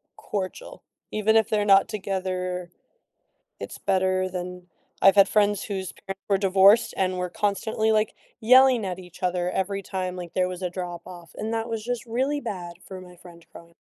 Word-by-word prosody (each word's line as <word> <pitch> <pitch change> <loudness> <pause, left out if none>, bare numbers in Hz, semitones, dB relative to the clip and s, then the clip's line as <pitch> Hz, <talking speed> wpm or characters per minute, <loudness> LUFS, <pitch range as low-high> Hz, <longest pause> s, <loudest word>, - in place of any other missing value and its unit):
cordial, 210 - -6 0.3
even 215 +1 +2
if 220 -1 +4
they're 210 -1 +1
not 195 -1 +5
together, 185 -3 -3 0.9
it's - - -7
better 185 -1 +1
than 180 0 -6 0.3
I've 195 - +7
had 195 -1 +7
friends 205 -1 +2
whose 190 -4 -4
parents 195 0 -9
were 200 - +4
divorced 195 +4 +5
and 185 -1 0
were 180 0 -2
constantly, 220 +2 0
like, 215 0 +1 0.3
yelling 255 -1 +5
at 185 -1 -4
each 180 0 -13
other 180 0 0
every 195 +1 -2
time, 185 -1 -4
like, 175 -2 -8
there 185 -1 +1
was 180 0 -6
a 180 - -1
drop 175 -1 -6
off, 170 -4 -12
and 220 +1 -4
that 225 0 -2
was 225 -2 -3
just 245 0 -3
really 260 +5 -1
bad 180 -9 -6
for 190 -1 -9
my 180 -1 -13
friend 170 -1 -15
growing. 170 0 -14
190 Hz, 180 wpm, -25 LUFS, 180-215 Hz, 0.9 s, I've